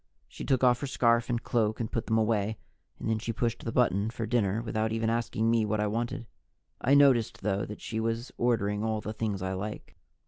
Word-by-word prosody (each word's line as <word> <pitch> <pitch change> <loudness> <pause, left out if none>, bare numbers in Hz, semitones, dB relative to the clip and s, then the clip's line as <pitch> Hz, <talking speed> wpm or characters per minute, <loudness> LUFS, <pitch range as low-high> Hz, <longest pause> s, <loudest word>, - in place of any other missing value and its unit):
She - - -9
took 130 -2 +1
off 125 -1 +4
her 140 - -2
scarf 115 -2 +2
and 120 -1 -1
cloak 110 -2 0
and 115 -2 -3
put 115 - -2
them 110 - +2
away, 110 -1 +1 0.4
and - - -5
then 110 -1 +1
she 115 +1 -3
pushed 115 +1 -2
the 115 - -3
button 110 -4 +2
for 115 -1 -4
dinner 110 -3 +1
without 110 -1 -1
even 115 0 0
asking 115 -1 0
me 115 -1 +3
what 105 0 0
I 105 - +2
wanted. 115 +3 -2 0.6
I 135 +3 +4
noticed, 130 -8 +4
though, 100 0 0
that 105 - -9
she 110 - -3
was 115 +2 -2
ordering 105 -4 0
all 110 -1 0
the 110 +1 -5
things 105 -4 -2
I 95 0 -2
like. 105 +3 -6
110 Hz, 220 wpm, -29 LUFS, 105-120 Hz, 0.6 s, off